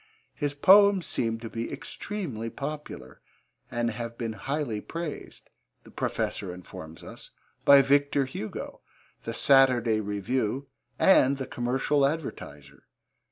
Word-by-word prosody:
His 145 -1 -3
poems 195 +3 +6
seem 115 -5 -1
to 115 - -6
be 115 +1 -5
extremely 140 - -5
popular, 150 +4 -7 0.5
and 120 0 -1
have 115 +1 -6
been 115 -2 -3
highly 135 -3 -3
praised, 165 +3 -7 0.3
the - - -16
Professor 95 - -3
informs 85 -3 -10
us, - - -10 0.4
by 140 -1 +8
Victor 140 0 +2
Hugo, 120 -4 -7 0.4
the - - -3
Saturday 125 -5 +4
Review 110 +5 -2 0.3
and 140 -8 +5
the 135 - -4
Commercial 130 +4 0
Advertiser. 135 - -4
130 Hz, 115 wpm, -27 LUFS, 115-145 Hz, 0.5 s, by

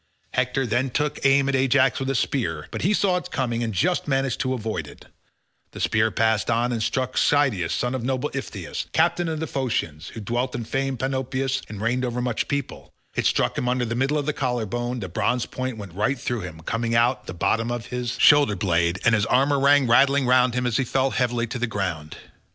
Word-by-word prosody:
Hector 135 - 0
then 120 +3 0
took 150 +3 -2
aim 135 0 +4
at 140 - 0
Ajax 130 0 +3
with 135 0 -2
a 135 - 0
spear, 95 - -1
but - - -4
he 190 - +2
saw 195 -3 +2
it 180 - -6
coming 120 -6 -1
and 115 -1 -1
just 175 - 0
managed 135 -3 0
to 130 0 0
avoid 110 -2 -4
it; - - -14 0.7
the - - -8
spear 110 +1 +2
passed 110 0 +1
on 120 +1 +1
and 115 -2 -2
struck 130 +3 -1
Schedius 130 - +2
son 125 +1 -1
of 130 -3 -3
noble 130 +3 -1
Iphitus, 100 - -5
captain 170 +2 +2
of 160 -1 -2
the 160 - -2
Phoceans, 100 - -3
who - - -6
dwelt 120 +4 -2
in 120 - -3
famed 135 +2 -2
Panopeus 135 +1 -1
and 105 - -7
reigned 120 +4 0
over 125 -1 -2
much 125 -3 -1
people; 140 -2 -4 0.2
it - - +1
struck - - +1
him 125 - -1
under 125 0 0
the 115 - -3
middle 135 +5 +1
of 145 - -1
the 150 - 0
collar 125 -6 -1
bone 120 +3 -3
the 95 - -4
bronze 120 +7 0
point 130 -2 -4
went 100 -5 -9
right 110 +9 0
through 120 -1 -2
him, 85 -3 -8
coming 115 +6 -2
out 120 +3 +3
at - - -27
the - - -5
bottom 115 +6 0
of 120 -1 -4
his 125 -1 -4
shoulder 145 -8 +6
blade, 85 -1 +1
and 115 - +5
his 110 -1 +2
armour 140 +3 +3
rang 140 0 +5
rattling 135 +3 +4
round 125 -1 +3
him 125 0 0
as 120 -3 +1
he 130 - +1
fell 135 +1 0
heavily 120 -2 0
to 120 +2 -5
the 120 - 0
ground. 90 -8 -4
125 Hz, 225 wpm, -24 LUFS, 115-135 Hz, 0.7 s, shoulder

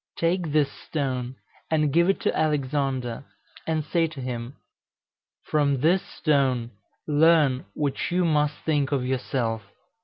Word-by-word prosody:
Take 170 -1 0
this 145 -2 +2
stone 130 -4 -3 0.3
and 155 -3 +1
give 170 +2 +4
it 195 - +2
to - - 0
Alexander, 135 -5 -1 0.4
and 160 -2 0
say 165 +1 +1
to 155 -3 -10
him, 125 0 -5 0.9
'From 140 -3 +1
this 175 +5 +4
stone 130 -6 0 0.4
learn 150 -3 +4
what 145 -2 -1
you 180 +1 +1
must 150 -2 +2
think 145 -3 +1
of 135 -3 0
yourself.'" 125 -3 -1
145 Hz, 130 wpm, -25 LUFS, 130-160 Hz, 0.9 s, give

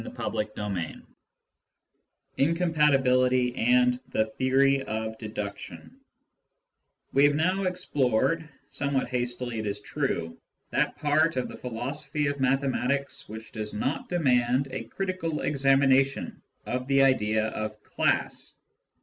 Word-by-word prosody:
CHAPTER - - -7 0.3
XIV 100 -6 -4 1.3
INCOMPATIBILITY 135 -6 +3
AND 125 +1 +3
THE 110 0 0
THEORY 135 +1 +3
OF 110 -3 -4
DEDUCTION 100 -7 -7 1.2
We 140 +2 +5
have 145 0 +4
now 185 +5 +1
explored, 155 -3 0 0.2
somewhat 140 -3 -1
hastily 120 -1 -2
it 110 - -3
is 100 0 -2
true, 105 - -3 0.3
that - - +1
part 155 +1 +2
of 125 - 0
the - - -8
philosophy 140 +5 -3
of 140 0 -1
mathematics 135 +1 0
which 110 +1 -9
does 105 -1 -5
not 135 +6 -2
demand 130 -5 +2
a 130 -3 -4
critical 185 +1 -3
examination 135 -1 +2 0.2
of 125 +1 -3
the 135 0 +4
idea 110 -4 +2
of 110 0 -5
class. - - -1
130 Hz, 115 wpm, -27 LUFS, 115-140 Hz, 1.3 s, We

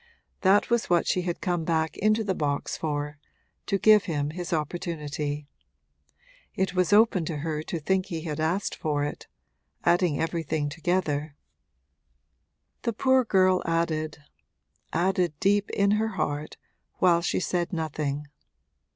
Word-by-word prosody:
That 200 +4 +4
was 235 -1 +1
what 175 -1 +3
she 180 - +1
had 175 -1 -3
come 175 -3 0
back 160 -1 0
into 215 +2 +2
the 195 -2 0
box 145 -4 -2
for 150 -1 -3 0.5
to 200 - +1
give 215 0 +6
him 150 -4 -1
his 175 +2 -6
opportunity. 150 -2 -3 1.1
It 190 -1 0
was 185 +1 +1
open 210 -3 +5
to 155 -1 -3
her 155 -2 -2
to 165 +2 -4
think 190 +4 0
he 165 -4 -4
had 155 -2 -4
asked 175 +5 0
for 150 -2 -1
it 145 - -5 0.6
adding 175 -4 +3
everything 160 -2 -1
together. 155 -2 -1 1.5
The 235 - -1
poor 260 +3 +3
girl 185 -4 +3
added, 160 -2 -1 0.7
added, 175 -2 0
deep 205 +1 +2
in 200 0 +2
her 220 +1 +1
heart, 145 +1 -2 0.4
while 170 -2 +4
she 170 - 0
said 175 -2 -1
nothing. 150 -3 -2
170 Hz, 140 wpm, -27 LUFS, 150-190 Hz, 1.5 s, give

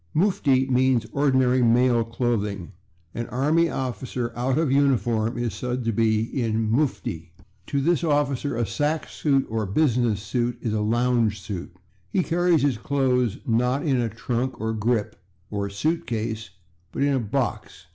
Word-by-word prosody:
/Mufti/ 150 -8 +2
means 130 -2 +2
ordinary 130 -3 +2
male 120 0 +4
clothing; 110 -5 -2 0.4
an 120 0 -4
army 155 +6 +2
officer 125 -2 -3
out 125 +2 0
of 160 -4 +1
uniform 120 -5 +2
is 120 -3 -2
said 125 +4 -3
to 115 - +1
be 110 0 +2
in 115 -2 -1
/mufti/. 115 - -1 0.4
To 140 - 0
this 170 +4 +1
officer 145 -3 0
a 120 - +1
sack 145 +10 -1
suit 135 -3 +1
or 110 -2 -2
business 120 -2 +1
suit 120 +2 -1
is 115 -3 -2
a - - 0
/lounge 115 0 +1
suit/. 95 -3 -7 0.3
He 185 - +1
carries 175 -2 +2
his 135 -6 +1
clothes, 125 -4 +1
not 125 +4 +1
in 135 -5 +2
a 115 - -1
/trunk/ 120 +4 -3
or 110 +1 -1
/grip/ 110 0 0 0.4
or 100 -1 -2
/suit 155 +12 -1
case/, 110 -2 -3 0.4
but - - -1
in 140 0 +2
a 135 - +2
/box 110 -4 -3
125 Hz, 155 wpm, -24 LUFS, 110-135 Hz, 0.4 s, male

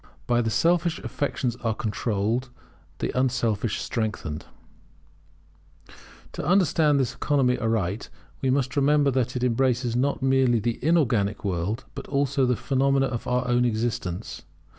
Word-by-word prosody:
[By 120 -1 +2
it 120 - 0
the - - +1
selfish 170 +6 +2
affections 130 -4 -2
are 115 -3 -2
controlled; 110 +3 -1 0.5
the - - -3
unselfish 120 -4 0
strengthened] 105 -9 -3 1.8
To - - -6
understand 155 -4 +3
this 130 -3 0
economy 135 -4 +1
aright; 110 -2 -1 0.3
we 135 - +1
must 130 -1 0
remember 145 0 +3
that 125 -1 -1
it 125 - -2
embraces 125 -1 +1
not 135 +2 0
merely 130 -3 +3
the 115 +3 -3
inorganic 120 -12 +1
world, 100 +6 -2
but - - -8
also 140 -1 +1
the 125 - +2
phenomena 135 +3 +1
of 120 -3 -4
our 125 0 0
own 120 0 +3
existence. 110 -5 -2
125 Hz, 140 wpm, -25 LUFS, 115-135 Hz, 1.8 s, understand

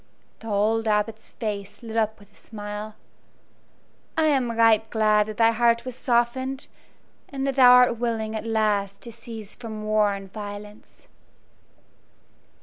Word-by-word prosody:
The 225 - -11
old 220 +2 +1
Abbot's 215 +1 -1
face 205 -1 -6
lit 225 -1 -7
up 220 -1 0
with 205 0 -20
a - - -26
smile. 210 0 -7 1.2
"I 320 - +3
am 260 -5 +1
right 225 -1 +4
glad 215 -1 +2
that 215 - -7
thy 230 0 +5
heart 235 +1 +2
was 255 - -5
softened, 260 +2 -1 0.6
and 270 -1 -4
that 275 -1 -1
thou 250 -2 +8
art 250 -2 +5
willing 225 -2 -2
at 220 - -4
last 210 -3 0
to 235 - -10
cease 225 -2 -10
from 220 -3 -8
war 215 -1 +2
and 195 -1 -9
violence." 210 0 -10
220 Hz, 145 wpm, -24 LUFS, 210-235 Hz, 1.2 s, thou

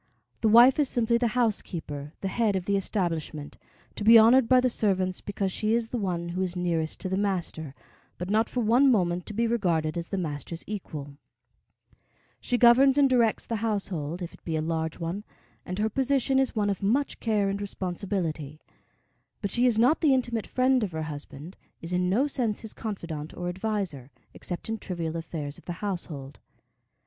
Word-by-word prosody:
The 220 - +2
wife 240 +6 +7
is 285 -3 +3
simply 235 0 +2
the 240 0 0
housekeeper, 165 -10 -2
the 195 - -2
head 215 0 +1
of 185 -2 -2
the 200 - +1
establishment, 165 -7 -2 0.4
to - - -4
be 225 +2 +9
honored 230 +2 +6
by 255 -1 +6
the 250 - +3
servants 190 -6 0
because 195 -1 -2
she 215 +4 0
is 230 -1 -1
the 245 - -2
one 175 -4 -2
who 180 +2 -3
is 185 -1 -1
nearest 170 -3 -1
to 185 - -2
the 190 - 0
master, 170 -7 -2 0.4
but 180 - -5
not 220 +3 +2
for 250 - -1
one 240 +5 +4
moment 180 -6 +1
to 210 - -6
be 235 +2 +1
regarded 175 -8 0
as 170 - -7
the 195 - -2
master's 165 -1 -5
equal. 150 -9 -7 1.2
She 245 - -1
governs 255 +3 +6
and 285 -1 +6
directs 240 -4 +2
the 230 - -2
household, 190 -7 -2
if 170 - -7
it - - -18
be 165 - -3
a 155 - 0
large 160 0 -2
one, 175 +5 -4 0.4
and 180 - -4
her 215 +1 +1
position 265 +3 +1
is 265 -2 0
one 205 -2 +1
of 195 - -4
much 245 +9 0
care 210 -3 +1
and 200 +1 -2
responsibility; 175 -6 -3 0.8
but 200 - -3
she 245 +3 +3
is 235 -3 +2
not 250 +8 +4
the 290 -5 +5
intimate 240 -4 -1
friend 255 -1 +2
of 190 -5 -3
her 160 0 -3
husband, 150 +2 -8 0.2
is 165 +2 -6
in 180 0 +1
no 230 +9 +3
sense 245 -7 -1
his 220 - -7
confidante 170 -8 -6
or 175 0 -3
adviser, 185 - -3 0.2
except 175 - -5
in 225 0 -3
trivial 170 -4 -4
affairs 160 -3 -5
of - - -21
the 175 - -4
household. 165 -8 -5
195 Hz, 195 wpm, -27 LUFS, 170-230 Hz, 1.2 s, be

